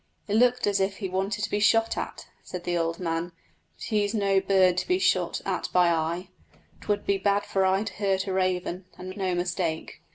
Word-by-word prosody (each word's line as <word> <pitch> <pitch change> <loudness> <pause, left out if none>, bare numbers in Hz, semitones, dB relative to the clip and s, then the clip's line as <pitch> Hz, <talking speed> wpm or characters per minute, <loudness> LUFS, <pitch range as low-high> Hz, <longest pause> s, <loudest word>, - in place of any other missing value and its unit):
"It 205 - -2
looked 245 +2 +4
as 200 -1 +1
if 195 0 0
he 195 - -3
wanted 195 +3 -2
to - - -1
be 205 - +1
shot 225 +2 +3
at," - - -5 0.2
said 180 -1 -7
the 175 0 -1
old 165 0 0
man, 170 0 -2 0.4
"but - - -12
he's 210 -1 0
no 195 -2 +3
bird 190 -2 +3
to - - -5
be 365 - +3
shot 380 - +1
at - - -2
by 180 -1 +4
I. 170 +3 -1 0.5
'Twould 205 -1 -1
be 200 -1 +1
bad 200 +1 +1
for 195 - 0
I 190 +2 +2
to - - -6
hurt 195 -2 0
a 190 - -3
raven, 185 -1 -1
and 185 +1 -7
no 185 -3 -1
mistake." 175 -2 -2
190 Hz, 215 wpm, -26 LUFS, 180-205 Hz, 0.5 s, looked